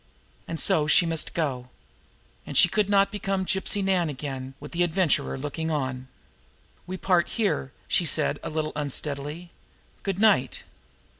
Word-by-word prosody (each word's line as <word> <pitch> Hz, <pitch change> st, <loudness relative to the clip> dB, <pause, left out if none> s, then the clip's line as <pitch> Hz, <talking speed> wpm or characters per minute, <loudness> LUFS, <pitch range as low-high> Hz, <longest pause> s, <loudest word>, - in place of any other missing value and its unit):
And 165 Hz, -, -4 dB
so 150 Hz, -2 st, +2 dB
she 160 Hz, +4 st, +6 dB
must 165 Hz, -1 st, -2 dB
go. 130 Hz, -6 st, -2 dB, 0.7 s
And -, -, -4 dB
she -, -, +8 dB
could 210 Hz, -2 st, 0 dB
not 200 Hz, -1 st, +4 dB
become 195 Hz, -2 st, -2 dB
Gypsy 195 Hz, +2 st, 0 dB
Nan 185 Hz, -4 st, +2 dB
again 135 Hz, -2 st, -6 dB
with 150 Hz, -, -10 dB
the 170 Hz, -, -2 dB
Adventurer 175 Hz, -4 st, +1 dB
looking 150 Hz, +4 st, -4 dB
on! 130 Hz, -4 st, -2 dB, 0.8 s
"We 185 Hz, +1 st, -4 dB
part 180 Hz, -2 st, +2 dB
here," 205 Hz, -, -1 dB, 0.2 s
she 175 Hz, -, +2 dB
said -, -, +1 dB
a -, -, -5 dB
little 155 Hz, -1 st, -2 dB
unsteadily. 150 Hz, +3 st, -3 dB, 0.5 s
"Good 195 Hz, -2 st, -2 dB
night!" 200 Hz, -11 st, +3 dB
160 Hz, 150 wpm, -26 LUFS, 145-190 Hz, 0.8 s, she